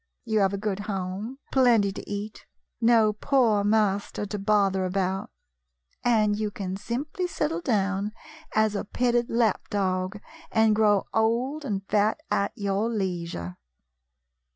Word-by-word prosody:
You 220 -2 +1
have 195 -1 +3
a 200 - -2
good 200 -1 -2
home, 200 +4 -4
plenty 235 -7 +4
to 195 - -9
eat, 205 +1 -6 0.3
no 225 -2 +5
poor 225 -3 +2
master 205 -1 +1
to 205 0 -4
bother 195 -2 +2
about, 190 +1 -1 0.7
and 215 -3 +3
you 215 0 -1
can 190 -2 -5
simply 290 - -3
settle 165 - -2
down 200 0 0 0.4
as 215 -1 +3
a 200 - -2
petted 240 +2 0
lap 230 -3 +1
dog, 185 0 -1 0.3
and 220 -1 +4
grow 210 -2 +3
old 240 +7 +1
and 195 -6 -3
fat 210 +5 +2
at 200 - +1
your 200 +2 -1
leisure." 170 - -3
210 Hz, 135 wpm, -26 LUFS, 195-225 Hz, 0.7 s, no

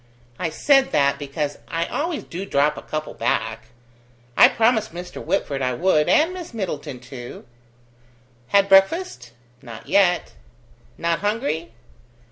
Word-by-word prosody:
I 170 - -1
said 270 - +3
that, 140 -1 +2
because 145 0 -4
I 165 +4 -2
always 315 - -3
do 180 +3 -7
drop 150 -5 +1
a - - -8
couple 155 0 -5
back. 110 0 -2 0.7
I - - +8
promised 225 -5 +1
Mr. 180 0 -7
Whitford 140 -8 -1
I 125 -1 0
would, 160 -1 +2
and 325 +4 +3
Miss 350 -9 -8
Middleton 160 - -4
too." 120 0 -10 1.0
"Had 200 +6 +3
breakfast?" 195 - +2 0.3
"Not 115 -2 -11
yet." 185 -2 +2 0.6
"Not 170 0 0
hungry?" 205 - -2
170 Hz, 130 wpm, -22 LUFS, 140-205 Hz, 1.0 s, I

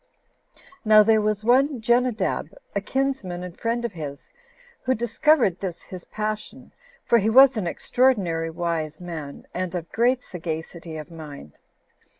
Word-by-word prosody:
Now 215 -2 +7
there 220 0 +4
was 210 0 -1
one 265 +3 +3
Jenadab, 235 -3 0 0.2
a 200 - +1
kinsman 260 -8 -2
and 180 -1 -8
friend 235 +1 -2
of 235 - -2
his, 145 -4 -8 0.5
who 260 0 +2
discovered 240 - +2
this 180 -3 -4
his 185 -2 -10
passion, 215 0 -5 0.3
for 235 - +4
he 215 +1 +1
was 265 +3 +7
an 205 -5 -2
extraordinary 180 -7 +1
wise 160 -2 -3
man, 160 -5 -7
and 185 0 -3
of 170 -2 -5
great 250 +2 +2
sagacity 165 -1 -6
of 155 +2 -9
mind. 150 - -10
200 Hz, 145 wpm, -24 LUFS, 170-240 Hz, 0.5 s, Now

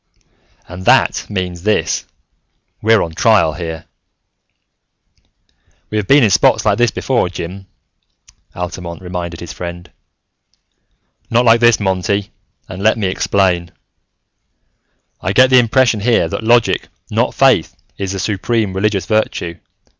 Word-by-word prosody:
"And 90 +2 -9
that - - +2
means 90 -4 -4
this: 105 +3 -1 0.7
we're 110 0 +3
on 80 - -6
trial 90 -2 +3
here!" 80 -1 -6 2.1
"We 110 - -1
have 100 - -4
been 140 +3 +5
in 105 - +3
spots - - +3
like - - +2
this 120 -1 +3
before, 120 -7 -1
Jim," 95 +2 -7 0.9
Altamont 90 -1 -6
reminded 90 -2 -6
his 85 - -8
friend. 85 0 -8 1.4
"Not 120 +2 +2
like 115 0 +5
this, 120 -1 +4
Monty, 95 0 -1 0.4
and 95 +1 -8
let 110 +2 +3
me 100 -4 -1
explain. 90 -3 0 1.5
"I 95 - -2
get 130 +2 +5
the 130 - +7
impression 120 -1 +2
here 110 -5 +2
that - - -4
logic, 120 0 +2 0.2
not - - 0
faith, - - +2 0.2
is 100 -1 -3
the - - -4
supreme 105 +1 -1
religious 100 0 -1
virtue. 90 -5 -2
95 Hz, 130 wpm, -16 LUFS, 90-110 Hz, 2.1 s, the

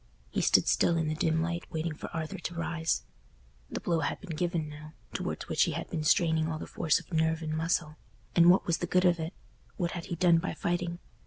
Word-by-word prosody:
He - - 0
stood - - +4
still 170 - +3
in 160 -1 0
the - - 0
dim 160 +1 +1
light 170 +1 -4
waiting 160 -1 -2
for 150 - -7
Arthur 165 +3 -4
to 175 0 -5
rise. 165 -1 -1 0.7
The - - -4
blow 170 -2 0
had 145 - -1
been 175 -5 -6
given 170 -1 -1
now, 150 +1 -10 0.2
towards - - -3
which - - 0
he - - -2
had - - -5
been 155 - -2
straining 160 0 +3
all 160 -1 -2
the - - -6
force 155 - +1
of - - -14
nerve 160 0 +1
and 155 0 -2
muscle—and 165 +1 +1
what 185 - +5
was 170 -1 +1
the 175 - -2
good 180 +2 +3
of 175 -1 +4
it? 160 +3 -4 0.4
What 175 -3 -1
had 170 -2 -5
he 170 - -4
done 170 -1 +5
by 185 - -3
fighting? 175 0 -1
165 Hz, 230 wpm, -30 LUFS, 160-175 Hz, 0.7 s, what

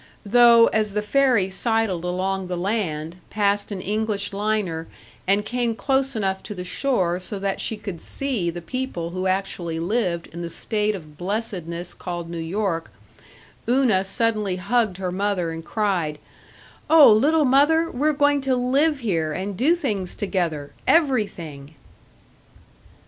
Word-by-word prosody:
Though, 235 +1 +7
as 215 -2 0
the 210 - 0
ferry 235 -5 +2
sidled 220 -4 0
along 185 +1 -2
the 180 -1 -3
land, 175 -4 -2
passed 205 0 0
an 195 -2 -4
English 210 0 -1
liner, 200 -6 -1 0.4
and 200 +2 +3
came 240 0 -1
close 270 +4 0
enough 190 -3 -1
to 210 - -8
the 180 - -5
shore 180 -4 0
so 190 +2 -5
that 195 0 -2
she 220 - -2
could 195 -5 -7
see 250 -11 -1
the 170 0 -6
people 215 -7 -4
who 185 +1 -2
actually 185 -3 -2
lived 175 -2 -1
in 170 - -6
the 170 - -4
state 210 +4 0
of 155 -5 -11
blessedness 180 -4 -4
called 175 -1 -6
New 170 - -4
York, 165 - -2 0.8
Una 245 -7 +3
suddenly 210 -1 0
hugged 205 +1 0
her 185 -2 -3
mother 185 -3 -1
and 165 0 -6
cried, 180 -7 -1 0.7
"Oh, 315 -8 +8
little 295 +8 +3
mother, 300 +5 +4
we're 295 +5 +1
going 290 -1 +2
to 265 -1 +1
live 275 +4 +1
here 165 -9 0
and 190 +4 -4
do 285 - +3
things 210 - -3
together 170 -8 -2
everything." 175 - 0
200 Hz, 150 wpm, -23 LUFS, 175-235 Hz, 0.8 s, Oh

